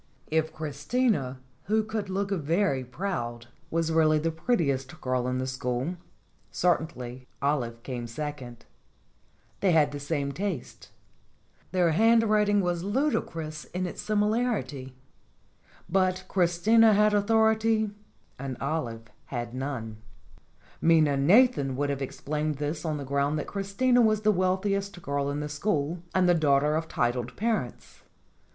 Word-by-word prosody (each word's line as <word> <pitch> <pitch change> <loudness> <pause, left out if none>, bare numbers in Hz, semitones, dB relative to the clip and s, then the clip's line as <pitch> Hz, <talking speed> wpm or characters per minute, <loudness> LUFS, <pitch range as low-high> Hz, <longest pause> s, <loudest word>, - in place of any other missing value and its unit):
If 160 0 +1
Christina, 150 - -1 0.3
who 215 +4 +2
could 215 -2 -4
look 195 +1 -2
very 165 -4 +1
proud, 120 -5 -4 0.2
was 165 0 0
really 155 -1 +4
the 165 +2 0
prettiest 160 - -1
girl 125 -1 -1
in 125 0 -1
the 130 - -2
school, 130 +5 -2 0.5
certainly 130 -8 -1
Olive 120 -5 -1
came 120 -3 -5
second. 125 -2 -6 0.9
They 190 -3 +3
had 150 -3 +4
the 145 - -5
same 140 -1 -2
tastes; 185 -4 -5 0.8
their 180 -3 +3
handwriting 215 +1 +4
was 175 -2 -1
ludicrous 165 - -2
in 185 +1 -3
its 180 - -5
similarity. 210 - -1 0.9
But 185 +1 +1
Christina 200 +5 +4
had 210 +1 +4
authority 220 +1 +3 0.5
and 135 -2 -5
Olive 125 -6 -3 0.2
had 120 -2 -5
none. 130 -5 -4 0.8
Minna 160 -3 +4
Nathan 145 - +4
would 145 +1 0
have 140 -1 -3
explained 150 +3 -3
this 150 +2 -3
on 155 -2 -1
the 140 - -5
ground 140 +2 0
that 150 - -3
Christina 205 +6 +1
was 215 -2 +3
the 215 0 +4
wealthiest 195 +1 0
girl 140 0 -1
in 145 +1 -2
the 150 - -3
school 150 +1 -1 0.2
and 185 -1 +4
the 175 - +5
daughter 150 -2 +3
of 160 +1 -1
titled 120 -3 -1
parents. 215 - -3
160 Hz, 130 wpm, -27 LUFS, 140-200 Hz, 0.9 s, the